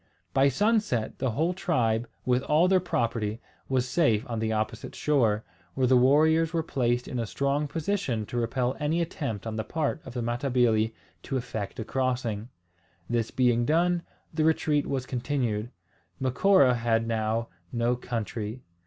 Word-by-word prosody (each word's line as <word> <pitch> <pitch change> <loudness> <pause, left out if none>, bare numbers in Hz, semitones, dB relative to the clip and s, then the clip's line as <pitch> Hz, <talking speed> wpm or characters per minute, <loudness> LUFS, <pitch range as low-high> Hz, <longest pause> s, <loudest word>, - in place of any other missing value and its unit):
By 135 +1 +5
sunset 205 - +1
the 130 - 0
whole 160 +10 0
tribe, 120 -11 0 0.2
with 125 0 +2
all 155 +6 +3
their 190 0 +4
property, 115 - -1 0.3
was 130 -1 +1
safe 125 -5 +2
on 115 -2 -3
the 110 0 0
opposite 110 +1 -3
shore, 115 -8 +2 0.3
where 130 - +2
the 130 +1 +4
warriors 155 +6 +4
were 165 -1 +1
placed 125 -4 0
in 125 - -3
a 115 - -2
strong 140 +9 0
position 155 - -1
to 120 - -5
repel 120 +2 0
any 150 +3 0
attempt 140 - -3
on 110 -1 -4
the 110 - -1
part 155 +1 -2
of 125 - -10
the 120 - -1
Matabili 120 -2 +1 0.3
to 135 - -3
effect 115 -3 -5
a 110 - -3
crossing. 125 -4 -1 0.6
This 115 -2 0
being 120 -2 +2
done, 170 +5 +2 0.3
the 155 0 +1
retreat 155 -2 +2
was 130 -2 -2
continued. 120 -4 -2 0.5
Macora 135 +2 +4
had 115 -1 +1
now 115 0 -1 0.2
no 120 +1 +1
country. 115 -1 -4
125 Hz, 160 wpm, -27 LUFS, 115-150 Hz, 0.6 s, By